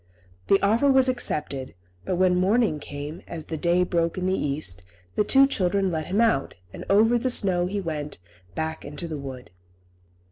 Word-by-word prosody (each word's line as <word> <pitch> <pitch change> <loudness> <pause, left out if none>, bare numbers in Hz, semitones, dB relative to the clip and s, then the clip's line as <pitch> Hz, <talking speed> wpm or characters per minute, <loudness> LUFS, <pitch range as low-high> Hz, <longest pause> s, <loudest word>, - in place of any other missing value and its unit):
The 195 - +4
offer 230 +8 +3
was 265 -1 +5
accepted, 150 - -1 0.3
but 185 - -1
when 180 0 +3
morning 195 -2 +2
came, 145 +4 -7
as 160 -2 -6
the 160 - -5
day 170 +3 +2
broke 170 -1 -1
in 185 - -2
the 185 - +1
east, 140 - -2 0.3
the - - +1
two 270 +5 +5
children 195 -6 0
let 160 -2 -3
him 195 +4 0
out, 225 -12 +1 0.2
and - - -8
over 225 +4 +4
the 255 +2 -1
snow 180 -7 +2
he 200 +2 -3
went 150 -5 -5 0.4
back 160 0 -3
into 145 +4 -6
the 155 -3 -5
wood. 130 -6 -9
180 Hz, 180 wpm, -25 LUFS, 150-205 Hz, 0.4 s, was